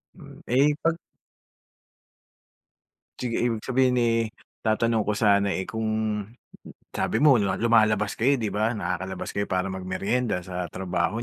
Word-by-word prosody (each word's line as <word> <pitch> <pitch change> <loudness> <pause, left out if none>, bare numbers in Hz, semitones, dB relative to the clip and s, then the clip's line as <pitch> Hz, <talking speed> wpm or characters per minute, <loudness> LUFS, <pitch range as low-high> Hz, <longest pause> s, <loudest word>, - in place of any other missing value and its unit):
Hmm. - - -13
Eh, 140 +5 +3
pag 165 0 +2 2.2
Sige 120 -2 -2
ibig 115 -3 -1
sabihin, 130 -1 +2
eh, 115 -1 +1 0.3
tatanong 110 0 +1
ko 105 - -1
sana, 100 -2 +3
eh, 95 -1 -2
kung, 110 -2 -2 1.0
sabi - - -1
mo 145 -5 +7
lumalabas 110 +1 +2
kayo 130 +5 +3
di 110 -2 -1
ba? 110 +3 0
Nakakalabas 95 -2 -4
kayo 100 0 -2
para 95 0 -1
mag 95 -1 -6
meryenda 100 +1 -1
sa 90 0 -4
trabaho 90 +5 -2
110 Hz, 135 wpm, -25 LUFS, 95-120 Hz, 2.2 s, mo